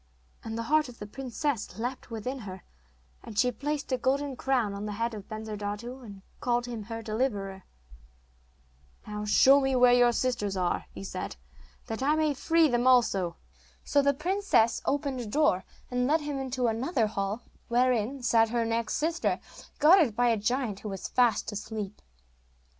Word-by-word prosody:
And 225 Hz, 0 st, -5 dB
the 230 Hz, -, -2 dB
heart 305 Hz, +3 st, +2 dB
of 240 Hz, -, -12 dB
the 205 Hz, -, -7 dB
princess 255 Hz, -, -3 dB
leapt 245 Hz, +3 st, -4 dB
within 245 Hz, +4 st, -4 dB
her, 190 Hz, -4 st, -8 dB, 0.6 s
and 215 Hz, -, -10 dB
she 250 Hz, +3 st, +4 dB
placed 285 Hz, +4 st, -3 dB
a 255 Hz, -, +1 dB
golden 275 Hz, +2 st, 0 dB
crown 245 Hz, -5 st, 0 dB
on 200 Hz, +1 st, -5 dB
the 210 Hz, -, -4 dB
head 230 Hz, +2 st, -2 dB
of 205 Hz, -3 st, -9 dB
Bensurdatu, 215 Hz, +3 st, -5 dB
and 200 Hz, -4 st, -11 dB, 0.2 s
called 240 Hz, -1 st, 0 dB
him 235 Hz, -3 st, -5 dB
her 225 Hz, 0 st, -6 dB
deliverer. 210 Hz, -4 st, -2 dB, 1.4 s
'Now 210 Hz, 0 st, -5 dB
show 270 Hz, +6 st, +6 dB
me 270 Hz, -1 st, +1 dB
where 250 Hz, -1 st, +6 dB
your 245 Hz, -1 st, +5 dB
sisters 235 Hz, -6 st, -1 dB
are,' 180 Hz, -1 st, 0 dB
he 100 Hz, -, -9 dB
said, -, -, -5 dB, 0.5 s
'that 225 Hz, +2 st, -5 dB
I 290 Hz, +3 st, +3 dB
may 310 Hz, -1 st, +2 dB
free 325 Hz, +3 st, +3 dB
them 245 Hz, -2 st, +1 dB
also.' 200 Hz, -9 st, +3 dB, 0.5 s
So 285 Hz, -, +3 dB
the 280 Hz, 0 st, +2 dB
princess 320 Hz, -, +2 dB
opened 280 Hz, -2 st, -1 dB
a 235 Hz, -, -6 dB
door, 210 Hz, -6 st, +2 dB, 0.3 s
and 250 Hz, 0 st, +1 dB
led 310 Hz, +3 st, +3 dB
him 290 Hz, -2 st, -3 dB
into 260 Hz, -1 st, -2 dB
another 235 Hz, +3 st, +1 dB
hall, 205 Hz, +2 st, -3 dB, 0.2 s
wherein 245 Hz, +1 st, +1 dB
sat 225 Hz, -2 st, +4 dB
her 235 Hz, 0 st, 0 dB
next 230 Hz, 0 st, -1 dB
sister, 325 Hz, +2 st, 0 dB, 0.4 s
guarded 305 Hz, -, +5 dB
by 245 Hz, +1 st, +3 dB
a 230 Hz, -, +3 dB
giant 220 Hz, -1 st, -1 dB
who 210 Hz, -, -6 dB
was 195 Hz, -2 st, -5 dB
fast 240 Hz, -4 st, +2 dB
asleep. 210 Hz, -1 st, -6 dB
240 Hz, 170 wpm, -28 LUFS, 215-270 Hz, 1.4 s, show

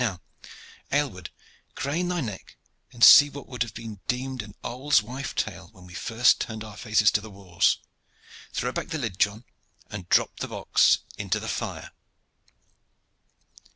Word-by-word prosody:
Now, 95 Hz, -7 st, -2 dB, 0.7 s
Aylward, 125 Hz, -, -1 dB, 0.5 s
crane 150 Hz, +8 st, -1 dB
thy 175 Hz, -1 st, -1 dB
neck 105 Hz, -7 st, -7 dB, 0.3 s
and 120 Hz, -1 st, -3 dB
see 145 Hz, +4 st, +10 dB
what 140 Hz, -2 st, -9 dB
would 125 Hz, -, -9 dB
have 115 Hz, -4 st, -1 dB
been 110 Hz, -3 st, -8 dB
deemed 130 Hz, 0 st, -2 dB
an 105 Hz, -1 st, -12 dB
old 135 Hz, +2 st, +2 dB
wife's 130 Hz, +4 st, -3 dB
tale -, -, -10 dB
when 90 Hz, -1 st, -16 dB
we 90 Hz, -, -13 dB
first 120 Hz, +6 st, +2 dB
turned 110 Hz, -2 st, -5 dB
our 105 Hz, -2 st, -10 dB
faces 105 Hz, -1 st, +3 dB
to 105 Hz, -, +1 dB
the 110 Hz, -, -10 dB
wars. 95 Hz, -4 st, +1 dB, 0.7 s
Throw -, -, -2 dB
back -, -, -4 dB
the 160 Hz, -, -3 dB
lid, 110 Hz, -10 st, -4 dB
John, 105 Hz, +3 st, +1 dB, 0.5 s
and 95 Hz, -4 st, -7 dB
drop -, -, +2 dB
the -, -, -3 dB
box -, -, +3 dB, 0.2 s
into -, -, -1 dB
the -, -, -7 dB
fire!" -, -, -4 dB
115 Hz, 160 wpm, -26 LUFS, 105-130 Hz, 0.7 s, see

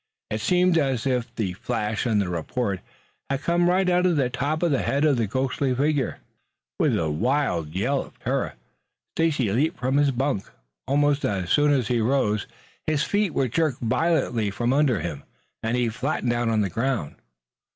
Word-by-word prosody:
It 110 Hz, 0 st, -2 dB
seemed 180 Hz, +5 st, +3 dB
as 135 Hz, -5 st, 0 dB
if 125 Hz, -2 st, -1 dB
the 100 Hz, -6 st, -2 dB
flash 110 Hz, +3 st, -2 dB
and 110 Hz, -3 st, +2 dB
the 100 Hz, -, 0 dB
report 95 Hz, +4 st, -2 dB, 0.5 s
had 140 Hz, +1 st, -2 dB
come 175 Hz, +1 st, +2 dB
right 185 Hz, +1 st, +2 dB
out 180 Hz, 0 st, +3 dB
of 175 Hz, -, +2 dB
the 130 Hz, -4 st, +1 dB
top 155 Hz, +6 st, -1 dB
of 170 Hz, -, +2 dB
the 135 Hz, -, +2 dB
head 140 Hz, +3 st, +1 dB
of 145 Hz, -4 st, +3 dB
the 115 Hz, -2 st, 0 dB
ghostly 130 Hz, +3 st, 0 dB
figure. 145 Hz, 0 st, 0 dB, 0.6 s
With -, -, +3 dB
a 80 Hz, -2 st, 0 dB
wild 90 Hz, -, 0 dB
yell 135 Hz, +8 st, +1 dB
of -, -, -19 dB
terror -, -, -2 dB, 0.6 s
Stacy 160 Hz, -6 st, +1 dB
Brown 100 Hz, 0 st, 0 dB
leaped 160 Hz, +6 st, +1 dB
from 130 Hz, +2 st, +1 dB
his 145 Hz, -1 st, +4 dB
bunk. 130 Hz, -5 st, -1 dB, 0.4 s
Almost 145 Hz, +1 st, +2 dB
as 95 Hz, -3 st, -1 dB
soon 145 Hz, 0 st, +4 dB
as 130 Hz, -6 st, +2 dB
he 120 Hz, -2 st, +2 dB
rose, 110 Hz, -4 st, +1 dB, 0.4 s
his 155 Hz, -2 st, +1 dB
feet 205 Hz, -4 st, 0 dB
were 135 Hz, -, +2 dB
jerked 150 Hz, +2 st, 0 dB
violently 125 Hz, -3 st, +1 dB
from 120 Hz, +5 st, 0 dB
under 140 Hz, -7 st, +2 dB
him 85 Hz, -5 st, -4 dB, 0.4 s
and 115 Hz, +2 st, 0 dB
he 120 Hz, -1 st, +1 dB
flattened 125 Hz, +1 st, -1 dB
out 120 Hz, -1 st, 0 dB
on 110 Hz, -1 st, +2 dB
the 95 Hz, -3 st, -1 dB
ground. 115 Hz, -, -2 dB
130 Hz, 190 wpm, -24 LUFS, 110-145 Hz, 0.6 s, his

